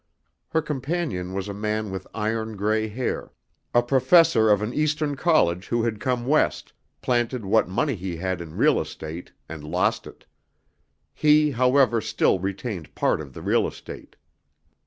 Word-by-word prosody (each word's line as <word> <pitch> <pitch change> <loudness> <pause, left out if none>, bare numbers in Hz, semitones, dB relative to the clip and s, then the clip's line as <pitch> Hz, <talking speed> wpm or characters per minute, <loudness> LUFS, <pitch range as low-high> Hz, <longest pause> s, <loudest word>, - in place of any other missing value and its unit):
Her 160 - 0
companion 140 - -3
was 95 0 -3
a 100 - -5
man 105 0 -2
with 95 -1 -6
iron 110 0 -2
gray 110 +2 0
hair, 120 +4 -4 0.4
a 120 - +3
professor 130 -1 +4
of 105 0 +3
an 110 +3 -3
Eastern 150 -1 0
college 115 - +2
who 120 -1 0
had 115 -3 -2
come 125 0 -1
West, 150 +4 +1 0.3
planted 120 -2 0
what 105 -1 +2
money 135 +10 0
he 95 -4 -5
had 95 0 -3
in 80 -2 -9
real - - +3
estate 80 +3 -8 0.2
and 80 -2 -8
lost 95 +8 0
it. - - -14 0.9
He, 150 0 +4
however, 125 -1 +3
still 110 -3 +1
retained 95 - -5
part - - +1
of 70 -4 -10
the - - -9
real - - +2
estate. - - -10
110 Hz, 155 wpm, -24 LUFS, 95-130 Hz, 0.9 s, professor